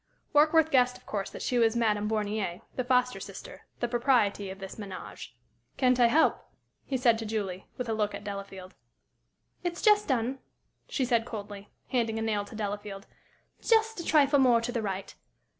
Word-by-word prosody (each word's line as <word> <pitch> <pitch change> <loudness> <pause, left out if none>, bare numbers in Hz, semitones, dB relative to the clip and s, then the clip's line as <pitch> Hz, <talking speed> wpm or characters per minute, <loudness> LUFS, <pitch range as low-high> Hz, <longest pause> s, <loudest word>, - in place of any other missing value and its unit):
Warkworth 310 +2 +5
guessed, 250 -1 +3
of - - -24
course, 200 -2 -3
that - - -8
she 245 - +1
was 225 0 +3
Madame 210 -3 +1
Bornier, 210 -4 -2
the 255 - -1
foster 250 0 +2
sister - - -10
the 240 - +1
"Propriety" 235 -5 +1
of 190 - -7
this 195 -1 -8
ménage. 195 -4 -8 0.5
"Can't 255 -1 +3
I 240 - +7
help?" 305 +7 +3 0.4
he 270 - -2
said 235 -3 +3
to 225 - -4
Julie, 195 -4 -3
with 250 - -3
a 225 - 0
look 210 -2 -1
at 200 - -8
Delafield. 195 -2 -7 0.9
"It's 345 -1 -3
just 420 -1 +5
done," 255 0 0 0.5
she 265 - 0
said, 235 -2 +2
coldly, 205 -3 -8 0.2
handing 230 -3 0
a 225 - -2
nail 210 -2 0
to 210 - -11
Delafield. 205 -1 -5 0.6
"Just 445 -2 +2
a - - -4
trifle 285 -3 +4
more 250 -3 +5
to 230 +1 -3
the 235 -2 -2
right. 195 -2 -4
230 Hz, 180 wpm, -29 LUFS, 205-255 Hz, 0.9 s, I